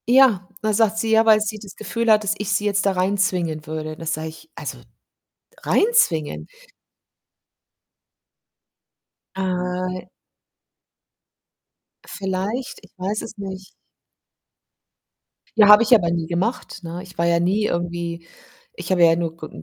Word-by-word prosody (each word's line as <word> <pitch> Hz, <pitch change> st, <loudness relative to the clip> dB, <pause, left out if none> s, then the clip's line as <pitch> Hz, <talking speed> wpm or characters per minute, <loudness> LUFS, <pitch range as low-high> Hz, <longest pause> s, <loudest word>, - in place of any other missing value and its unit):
Ja, 240 Hz, -7 st, +5 dB, 0.2 s
da 215 Hz, 0 st, +1 dB
sagt 220 Hz, 0 st, +2 dB
sie, 225 Hz, 0 st, -1 dB
ja, 225 Hz, 0 st, +5 dB
weil 215 Hz, -1 st, +6 dB
sie 215 Hz, 0 st, -3 dB
das 200 Hz, -2 st, -12 dB
Gefühl 230 Hz, +2 st, -1 dB
hat, 215 Hz, 0 st, +5 dB
dass 210 Hz, 0 st, 0 dB
ich 205 Hz, -1 st, -4 dB
sie 205 Hz, 0 st, 0 dB
jetzt 200 Hz, -1 st, +1 dB
da 195 Hz, -, +2 dB
reinzwingen 180 Hz, -5 st, -1 dB
würde. 155 Hz, 0 st, -5 dB
Da 165 Hz, -, -9 dB
sage 160 Hz, 0 st, -3 dB
ich: 160 Hz, -, -14 dB
„Also, -, -, -6 dB, 0.8 s
reinzwingen?“ 185 Hz, -, +1 dB, 2.9 s
Äh 185 Hz, -1 st, -3 dB, 2.0 s
Vielleicht, 195 Hz, +6 st, -4 dB
ich -, -, -18 dB
weiß 195 Hz, +4 st, -2 dB
es 225 Hz, -, -9 dB
nicht. 190 Hz, -1 st, -7 dB, 1.9 s
Ja, 210 Hz, -2 st, +7 dB
habe 210 Hz, +2 st, +9 dB
ich 235 Hz, -, +4 dB
aber 185 Hz, -7 st, +5 dB
nie 170 Hz, -1 st, -2 dB
gemacht, 190 Hz, +6 st, -2 dB
ne? 170 Hz, +2 st, -6 dB
Ich 185 Hz, -1 st, -14 dB
war 170 Hz, -, +1 dB
ja 170 Hz, 0 st, +3 dB
nie 195 Hz, +5 st, +1 dB
irgendwie 170 Hz, -2 st, -3 dB, 0.5 s
ich -, -, -8 dB
habe 185 Hz, -2 st, +2 dB
ihr 170 Hz, -, +7 dB
ja -, -, +3 dB
nur 165 Hz, -1 st, -3 dB
ge 160 Hz, -2 st, -9 dB
190 Hz, 140 wpm, -22 LUFS, 170-215 Hz, 2.9 s, habe